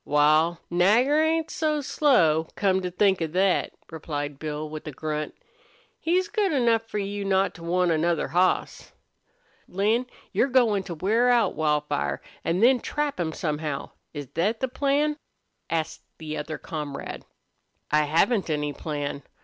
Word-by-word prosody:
"Wal, 155 +3 +3
Nagger 230 - +4
ain't 320 0 +1
so 305 -1 0
slow, 175 - +3
come 190 -2 +2
to 180 - -3
think 190 0 +2
of 160 -1 -2
thet," 190 0 +2 0.2
replied 145 -3 -5
Bill, 155 0 -4
with 155 0 -8
a - - -4
grunt. 150 +2 -4 0.6
"He's 360 +3 +1
good 415 -4 0
enough 235 -5 +3
for 210 - -4
you 200 0 -3
not 195 0 +1
to 165 - -12
want 180 +1 +1
another 165 +1 +1
hoss." 180 +2 0 0.7
"Lin, 215 +7 +1 0.2
you're 260 - +2
goin' 240 -6 +3
to 175 - -5
wear 220 +9 +2
out 240 -1 +3
Wildfire, 150 - 0 0.2
an' 175 +4 0
then 250 +2 +5
trap 295 -1 -2
him 165 -2 -1
somehow 150 -2 -3 0.2
is 145 -2 -6
thet 205 +7 0
the 260 - 0
plan?" 285 +3 0 0.5
asked 160 -1 -2 0.2
the 155 -1 -6
other 155 +1 -4
comrade. 150 -3 -6 0.7
"I 150 0 +4
haven't 170 +7 +2
any 150 -1 -1
plan. 145 -2 -4
180 Hz, 150 wpm, -25 LUFS, 155-235 Hz, 0.7 s, then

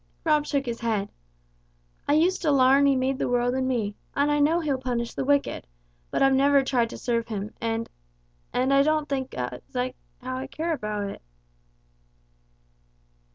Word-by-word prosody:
Rob 300 -2 +2
shook 280 -2 0
his 235 -1 -4
head. 215 -4 -1 1.0
"I 285 - +3
used 345 +5 +3
to 320 - +1
larn 275 0 +5
He 275 - +4
made 260 +1 0
the - - 0
world 245 0 +1
and 260 0 0
me, 225 -5 -1 0.2
and 285 +1 +2
I 295 - +2
know 310 +4 +3
He'll 290 -5 -1
punish 240 -2 -2
the - - -2
wicked, 285 - 0 0.4
but - - +1
I've 270 0 +5
never 280 +1 +4
tried 245 -3 +1
to - - -8
serve 235 -2 -1
Him, 210 -1 -5
and 230 0 -1 0.6
and 260 +2 +1
I 275 - +6
don't 305 +1 +1
think 265 -2 -3
as 125 0 -4
how 255 0 -5
I 265 +1 -5
care 325 +4 -2
about 210 -7 -3
it." - - -8
260 Hz, 175 wpm, -26 LUFS, 235-285 Hz, 1.0 s, I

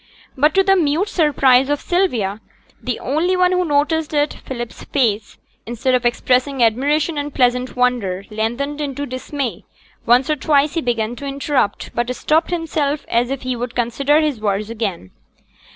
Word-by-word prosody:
But 300 +1 +2
to 385 - +5
the 390 0 +4
mute 335 +3 +1
surprise 270 -5 +3
of 290 -1 +1
Sylvia, 235 - 0 0.4
the 250 -2 -3
only 335 +7 0
one 365 0 +3
who 365 0 +2
noticed 305 0 0
it, 295 0 +1
Philip's 240 -3 -6
face, 225 -6 -1 0.3
instead 240 +3 -1
of 250 -1 +3
expressing 255 +2 +1
admiration 290 +7 +1
and 290 0 -4
pleasant 250 -1 +1
wonder, 240 -7 0
lengthened 240 +7 -2
into 285 0 -3
dismay; 255 0 -4 0.4
once 245 +3 +4
or 305 - +1
twice 285 +1 +2
he 330 - -1
began 235 -2 -1
to 280 - -6
interrupt, 275 -6 -1
but 245 +1 -1
stopped 315 +5 +1
himself 310 -4 -1
as 240 +1 +1
if 275 -1 -4
he 255 0 -2
would 245 0 -5
consider 275 +6 +2
his 295 -8 -1
words 205 +1 -1
again. 200 - -4
270 Hz, 165 wpm, -19 LUFS, 240-300 Hz, 0.4 s, to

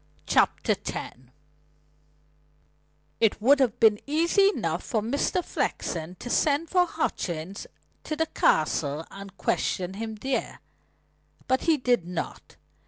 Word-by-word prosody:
CHAPTER - - +2
X - - -5 2.0
It 225 -2 +2
would 270 +6 +5
have 250 -5 +1
been 215 -2 +5
easy 340 +7 +4
enough - - -2
for 225 - -1
Mr. 285 +9 0
Flexen 165 +2 -3
to 245 - -9
send 295 +5 +1
for 360 -1 +4
Hutchings 185 - -3 0.4
to 310 - -2
the 320 +1 +1
Castle 155 - +1
and 195 0 -10
question 185 0 -1
him 220 +2 -5
there. 260 +4 -3 0.9
But 260 0 +2
he 320 - +5
did 245 -9 +1
not. 180 -2 -6
230 Hz, 120 wpm, -26 LUFS, 190-300 Hz, 2.0 s, would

